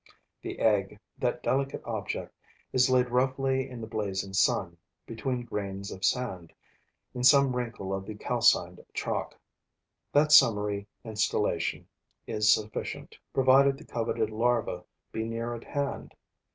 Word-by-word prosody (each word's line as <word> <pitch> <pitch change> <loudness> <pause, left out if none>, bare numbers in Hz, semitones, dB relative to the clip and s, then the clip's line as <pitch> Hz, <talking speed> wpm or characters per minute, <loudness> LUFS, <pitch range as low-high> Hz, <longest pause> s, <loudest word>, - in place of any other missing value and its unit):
The - - -6
egg, 100 -3 +1 0.2
that - - -1
delicate 135 +1 -1
object, - - -4 0.4
is 130 0 +4
laid 125 -1 +3
roughly 130 +1 +1
in 125 -2 -8
the - - -4
blazing 100 -3 -3
sun, 90 -4 +1 0.3
between 120 +2 -3
grains 100 -3 -5
of 95 - -9
sand, 95 -10 -1 0.6
in 125 - -4
some 135 0 +6
wrinkle 115 -6 -4
of 95 0 -4
the 110 - -6
calcined - - +2
chalk. - - -3 0.7
That 150 +1 +3
summary 105 -7 +5 0.2
installation 110 -2 -1 0.4
is 110 0 +3
sufficient, 110 0 -2 0.2
provided 135 +1 +5
the - - -13
coveted 115 -2 -2
larva 115 -5 0 0.3
be 110 - -3
near 115 +1 -3
at 120 - -8
hand. 140 -1 -4
115 Hz, 130 wpm, -28 LUFS, 105-130 Hz, 0.7 s, some